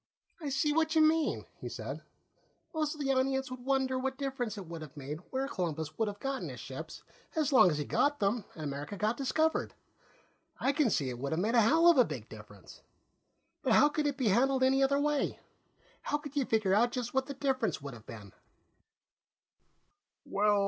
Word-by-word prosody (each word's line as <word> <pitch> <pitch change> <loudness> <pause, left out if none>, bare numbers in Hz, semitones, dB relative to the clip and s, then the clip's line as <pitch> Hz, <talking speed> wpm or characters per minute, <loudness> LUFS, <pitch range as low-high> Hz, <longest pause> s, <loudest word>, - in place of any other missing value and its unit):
"I 300 -4 -4
see 295 +2 +1
what 320 +1 +1
you 315 - +6
mean," 315 0 +2
he - - -6
said. - - -6 0.7
"Most 310 -1 -1
of 300 - -7
the 270 -1 +1
audience 265 0 0
would 255 -1 -7
wonder 265 -1 +1
what 265 0 -2
difference 265 -6 -3
it 195 - -6
would 165 -1 -7
have 155 0 -10
made 145 +2 -5
where 265 +1 -1
Columbus 160 - -3
would 225 - 0
have 205 0 -5
gotten 270 -1 -3
his - - -8
ships, - - -8 0.3
as 300 -3 +1
long 180 -8 +7
as 150 - -1
he 150 - -2
got 290 - +1
them 205 +2 +1
and 155 - -7
America 145 +6 -5
got 215 +3 +1
discovered. 315 +4 0 0.8
I 270 - +2
can 285 -3 +2
see 140 -9 0
it 120 - -7
would 140 +3 -2
have 160 - 0
made 215 +5 0
a 235 - +6
hell 320 +10 +4
of 340 -6 +7
a - - +9
big 130 - -6
difference. 105 -2 -13 0.8
But - - +2
how 295 - +6
could 300 -1 0
it 280 -2 -2
be 250 -6 +2
handled 260 +5 +3
any 265 +1 +4
other 280 +1 +3
way? 295 0 0 0.6
How 295 - -1
could 295 -1 -10
you 280 -3 +1
figure 215 -5 +2
out 235 +4 +4
just 250 -3 -4
what 265 0 +1
the 280 - -6
difference 260 - 0
would 140 -1 -7
have 115 -2 -13
been?" 105 -5 -10
260 Hz, 205 wpm, -31 LUFS, 180-280 Hz, 0.8 s, a